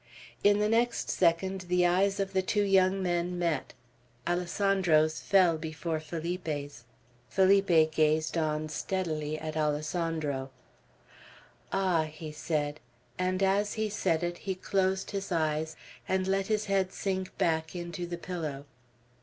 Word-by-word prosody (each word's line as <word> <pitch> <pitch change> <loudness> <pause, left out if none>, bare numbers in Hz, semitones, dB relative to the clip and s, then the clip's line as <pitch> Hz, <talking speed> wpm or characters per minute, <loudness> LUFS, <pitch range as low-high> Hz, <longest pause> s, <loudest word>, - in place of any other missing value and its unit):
In 205 0 +5
the 210 0 +2
next 235 +2 +1
second, 185 +2 +1
the 180 0 +3
eyes 195 +3 +2
of 195 0 -2
the 190 - +3
two 205 +2 +1
young 190 -1 +3
men 175 0 -1
met. 165 -6 -1 0.5
Alessandro's 175 -3 +2
fell 180 -5 +3
before 160 +1 -3
Felipe's. 155 -5 -4 0.4
Felipe 190 -5 +4
gazed 155 +1 +2
on, 155 -1 0
steadily, 155 -2 -2
at 155 0 -5
Alessandro. 150 -2 -1 1.2
"Ah!" 185 -5 +2
he 155 0 -8
said; 150 -1 -2 0.4
and 185 +1 0
as 200 +2 +2
he 220 -1 -1
said 165 -5 0
it, 175 0 -2
he 190 -2 -3
closed 190 0 0
his 200 -1 -4
eyes, 160 -1 0 0.3
and 190 0 +1
let 195 0 0
his 215 -1 0
head 195 -2 +1
sink 190 -1 -3
back 160 0 0
into 175 0 -5
the 175 0 -4
pillow. 155 -6 -5
175 Hz, 135 wpm, -29 LUFS, 155-190 Hz, 1.2 s, In